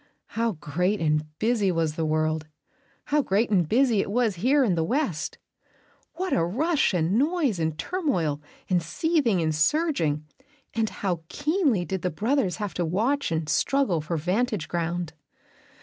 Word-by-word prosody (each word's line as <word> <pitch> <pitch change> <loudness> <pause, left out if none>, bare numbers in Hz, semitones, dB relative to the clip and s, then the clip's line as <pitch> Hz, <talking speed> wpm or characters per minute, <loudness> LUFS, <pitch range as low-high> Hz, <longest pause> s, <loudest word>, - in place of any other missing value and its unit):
How 230 0 0
great 180 +6 -1
and 155 -1 +1
busy 220 -2 +1
was 165 -3 0
the 160 0 -2
world, 155 0 0 0.6
how 295 +1 +2
great 215 -1 +1
and 175 -6 +2
busy 240 -2 +3
it - - -4
was 220 -3 +1
here 265 +9 +3
in 210 -7 +2
the 165 -1 +1
West! 185 - -1 0.8
What 370 +2 -2
a 165 - +2
rush 295 - +1
and 180 +4 +1
noise 290 - +1
and 160 -1 -1
turmoil 180 - -1 0.3
and 180 -2 +2
seething 240 - +1
and 155 -1 +1
surging, 155 - +1 0.5
and 225 -1 0
how 180 -5 -3
keenly 290 - +1
did 190 -1 -3
the 180 - 0
brothers 215 - 0
have 205 -3 -4
to 175 - -1
watch 220 - 0
and 160 -1 -1
struggle 195 - +1
for 160 +2 -3
vantage 190 +3 -1
ground. 170 -1 -2
190 Hz, 160 wpm, -26 LUFS, 165-260 Hz, 0.8 s, busy